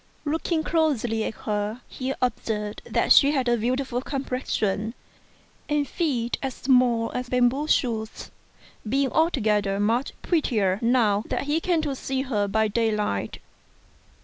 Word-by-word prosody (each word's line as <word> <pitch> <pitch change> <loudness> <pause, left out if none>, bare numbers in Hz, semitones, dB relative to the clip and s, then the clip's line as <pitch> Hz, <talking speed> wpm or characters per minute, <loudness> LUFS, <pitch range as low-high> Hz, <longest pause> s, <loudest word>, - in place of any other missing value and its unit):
Looking 320 +2 -1
closely 265 -10 +1
at - - -4
her, 210 +3 -2
he 260 0 -4
observed 210 -4 -2
that - - +1
she 280 - +6
had 265 -4 0
a 240 - +4
beautiful 250 +2 -1
complexion, 250 -6 -2 0.7
and 295 -1 +1
feet 255 -9 -1
as 265 -2 -3
small 250 -3 +2
as 250 0 -4
bamboo 250 +4 +2
shoots, 225 -6 -1 0.5
2 215 - -7
being 270 +2 +1
altogether 210 - +1
much 230 +6 0
prettier 215 - +1
now 230 -4 +2
that - - -2
he 295 +3 0
came 330 -2 0
to 290 -3 -1
see 265 0 -2
her 210 -7 -1
by 220 +2 +1
daylight. 210 - -1
245 Hz, 140 wpm, -25 LUFS, 215-275 Hz, 0.7 s, she